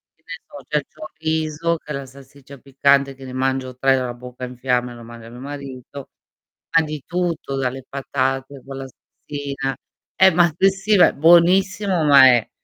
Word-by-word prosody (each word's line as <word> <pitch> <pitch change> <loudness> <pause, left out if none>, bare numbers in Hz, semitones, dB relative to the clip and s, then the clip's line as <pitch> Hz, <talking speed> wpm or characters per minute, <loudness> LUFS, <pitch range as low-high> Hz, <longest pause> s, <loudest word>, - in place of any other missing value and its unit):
Che 160 - -41
ne 180 - -9
so, 140 -2 -12
c'è 150 - 0
il 145 - -3
chorizo, 160 +1 -2
che 150 - -11
è - - -2
la 140 0 -6
salsiccia 135 +1 -15
piccante, 140 0 +1
che 135 - -14
ne 130 - -9
mangio 130 0 -2
3 135 0 +3
e 130 - +1
ho - - -2
la 120 - -5
bocca 125 +1 -11
in 125 -1 -7
fiamme 125 -1 -1
e - - -10
lo 120 - -12
mandi 115 0 -12
a 115 - -11
mio 120 +1 -12
marito 140 -1 -9 0.7
ma 160 - +4
di 150 -2 -6
tutto, 170 -6 -3
dalle 130 0 -3
patate 135 0 -3
con 135 0 -8
la 135 - -6
salsina 140 0 -6 0.4
eh, 190 0 +6
ma 175 +1 +4
s 190 +2 +4
sì, 195 +2 +1
va 180 - +6
buonissimo 175 +2 +3
ma 140 -2 +8
è 120 -3 +3
140 Hz, 205 wpm, -20 LUFS, 130-160 Hz, 0.7 s, ma